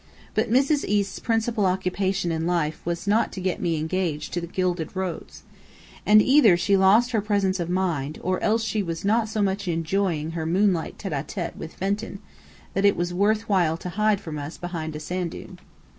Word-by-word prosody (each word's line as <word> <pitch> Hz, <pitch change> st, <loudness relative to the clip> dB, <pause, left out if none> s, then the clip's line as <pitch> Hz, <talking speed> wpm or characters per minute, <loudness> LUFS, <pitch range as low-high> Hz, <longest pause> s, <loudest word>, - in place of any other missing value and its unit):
But 220 Hz, +1 st, 0 dB
Mrs. 275 Hz, +5 st, +3 dB
East's 200 Hz, -1 st, 0 dB
principal 225 Hz, -3 st, 0 dB
occupation 185 Hz, 0 st, 0 dB
in 160 Hz, 0 st, -1 dB
life 165 Hz, -3 st, -1 dB
was 170 Hz, +1 st, -3 dB
not 210 Hz, +3 st, +2 dB
to -, -, -5 dB
get 185 Hz, -1 st, -2 dB
me 170 Hz, -3 st, 0 dB
engaged 155 Hz, -2 st, -2 dB
to 175 Hz, -, -1 dB
the 170 Hz, -, -5 dB
Gilded 180 Hz, -1 st, -2 dB
Rose. 185 Hz, -3 st, -5 dB, 0.6 s
And 210 Hz, 0 st, +7 dB
either 260 Hz, -10 st, +6 dB
she 195 Hz, +3 st, +2 dB
lost 205 Hz, +6 st, +4 dB
her 220 Hz, -3 st, +1 dB
presence 200 Hz, -2 st, 0 dB
of 170 Hz, -1 st, -2 dB
mind, 165 Hz, -6 st, -1 dB
or 185 Hz, +1 st, -1 dB
else 225 Hz, +1 st, +2 dB
she 220 Hz, -1 st, -1 dB
was 165 Hz, -1 st, -4 dB
not 220 Hz, +2 st, +2 dB
so 215 Hz, -1 st, 0 dB
much 195 Hz, 0 st, -1 dB
enjoying 165 Hz, -1 st, -1 dB
her 160 Hz, -1 st, -3 dB
moonlight 180 Hz, -1 st, +1 dB
tête 195 Hz, -, -5 dB
à 140 Hz, -1 st, -1 dB
tête 175 Hz, 0 st, -5 dB
with 160 Hz, -, -8 dB
Fenton, 200 Hz, +1 st, -2 dB, 0.6 s
that 195 Hz, -, 0 dB
it 200 Hz, -, +5 dB
was 175 Hz, +1 st, -1 dB
worth 215 Hz, +4 st, +1 dB
while 175 Hz, -5 st, +2 dB
to 180 Hz, -, -6 dB
hide 210 Hz, +2 st, +1 dB
from 160 Hz, -6 st, -6 dB
us 145 Hz, +3 st, -7 dB
behind 165 Hz, -3 st, -5 dB
a -, -, -4 dB
sand 180 Hz, +3 st, -3 dB
dune. -, -, -10 dB
185 Hz, 200 wpm, -24 LUFS, 170-205 Hz, 0.6 s, And